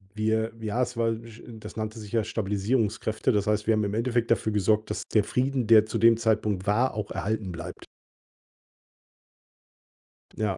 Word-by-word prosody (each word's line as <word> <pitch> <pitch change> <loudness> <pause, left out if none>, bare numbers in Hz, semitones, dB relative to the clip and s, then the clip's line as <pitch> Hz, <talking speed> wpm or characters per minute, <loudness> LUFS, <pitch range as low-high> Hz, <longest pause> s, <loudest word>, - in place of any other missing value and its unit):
Wir 110 +1 0
ja, 110 +2 -2
es 125 -1 -2
war, 115 -1 +2
j 115 0 -8 0.2
das 105 - -9
nannte 110 0 -4
sich 105 -2 -10
ja 115 -2 +1
Stabilisierungskräfte. 110 +1 -1
Das 105 0 0
heißt, 105 0 0
wir 115 - +4
haben 110 -1 +1
im 100 0 -2
Endeffekt 115 +1 0
dafür 110 -1 +1
gesorgt, 105 +1 +1
dass - - -3
der 105 - +4
Frieden, 125 +2 -1
der 110 -2 +7
zu 110 - -3
dem 115 0 +5
Zeitpunkt 105 -4 0
war, 120 +6 +2
auch 105 0 -4
erhalten 105 -2 -2
bleibt. 85 -2 -8 2.5
Ja. 105 -3 -1
110 Hz, 170 wpm, -26 LUFS, 105-115 Hz, 2.5 s, der